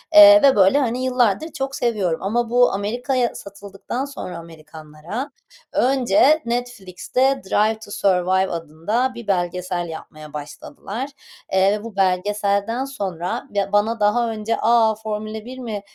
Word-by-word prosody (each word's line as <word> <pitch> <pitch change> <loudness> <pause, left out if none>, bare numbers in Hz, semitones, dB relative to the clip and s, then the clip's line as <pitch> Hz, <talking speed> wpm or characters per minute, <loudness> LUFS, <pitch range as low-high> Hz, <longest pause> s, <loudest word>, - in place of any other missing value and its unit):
eee, 305 0 +10
ve 275 -1 +6
böyle, 195 +6 +5
hani, 250 -1 -1
yıllardır 250 +2 +1
çok 270 -1 -4
seviyorum 205 -10 -1
ama 230 +3 0
bu 245 +1 +4
Amerika'ya 240 +5 -1
satıldıktan 200 +5 -6
sonra 280 -10 -7
Amerikanlara 160 - -8 0.4
önce 265 +4 +3
Netflix'te 245 +2 -1
“Drive 215 +3 +1
to 220 -2 -12
Survive” 190 -1 +1
adında 170 +11 -2
bir 235 -2 -9
belgesel 180 -2 -2
yapmaya 155 -1 -10
başladılar. 200 - -7 0.4
Eee, 195 +2 +3
bu 230 -3 -9
belgeselden 200 +5 0
sonra, 190 -10 -4
ya, 200 -1 -1
bana 215 +2 +1
daha 230 +3 +2
önce, 220 +1 -2
"A! 225 -1 +4
Formula 215 0 -5
1 255 +1 -9
mi 220 -5 -5
210 Hz, 130 wpm, -21 LUFS, 190-245 Hz, 0.4 s, eee